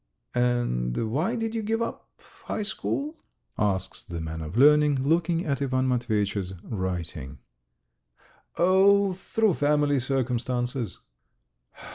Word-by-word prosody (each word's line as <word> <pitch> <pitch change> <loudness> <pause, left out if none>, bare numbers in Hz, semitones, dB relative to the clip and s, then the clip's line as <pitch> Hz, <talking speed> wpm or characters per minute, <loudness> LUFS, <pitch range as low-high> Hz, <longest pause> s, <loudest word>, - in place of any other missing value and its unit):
"And 115 - 0
why 165 - 0
did 225 -1 -2
you 225 - -1
give 225 +2 -1
up 230 - -4 0.4
high 215 - -2
school?" 285 +9 -3 0.4
asks 95 -3 -1
the 85 -1 -6
man 80 0 -5
of 80 +7 -5
learning, 150 +2 +6
looking 165 +5 +1
at 140 -3 -1
Ivan 130 -1 +1
Matveyitch's 105 -6 -1
writing. 85 - -4 1.2
"Oh, 195 +2 +5
through 200 +3 +1
family 145 -1 +2
circumstances." 125 -2 -2
130 Hz, 110 wpm, -26 LUFS, 105-175 Hz, 1.2 s, learning